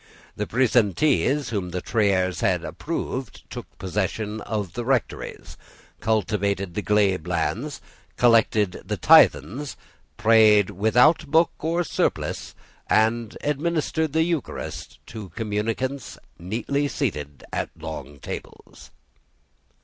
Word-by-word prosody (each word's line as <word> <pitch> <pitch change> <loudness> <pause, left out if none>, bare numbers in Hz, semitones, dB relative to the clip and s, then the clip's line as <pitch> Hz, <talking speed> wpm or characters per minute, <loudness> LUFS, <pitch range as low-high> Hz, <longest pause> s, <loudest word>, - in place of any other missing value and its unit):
The 105 - -3
presentees 130 - +2
whom 100 -5 -2
the 90 +1 -3
Triers 95 -5 +1
had 95 -6 +1
approved 125 - -5
took - - -7
possession 105 +3 -2
of 105 -6 -3
the 120 - -3
rectories, 130 -1 -2 0.4
cultivated 100 -3 0
the 105 - -2
glebe 100 -5 +1
lands, 90 - -2 0.4
collected 110 -5 +3
the - - -3
tithes, 115 - +4 0.4
prayed 110 -2 +5
without 125 - +3
book 160 +4 +4
or 170 +3 0
surplice, - - -2 0.3
and 110 +1 +1
administered 155 0 -1
the 160 0 +3
Eucharist 165 -4 -4
to 110 -4 -8
communicants 115 +6 -3 0.7
seated 75 - -3
at - - -2
long 70 +2 -7
tables. - - -9
110 Hz, 105 wpm, -24 LUFS, 100-135 Hz, 0.7 s, prayed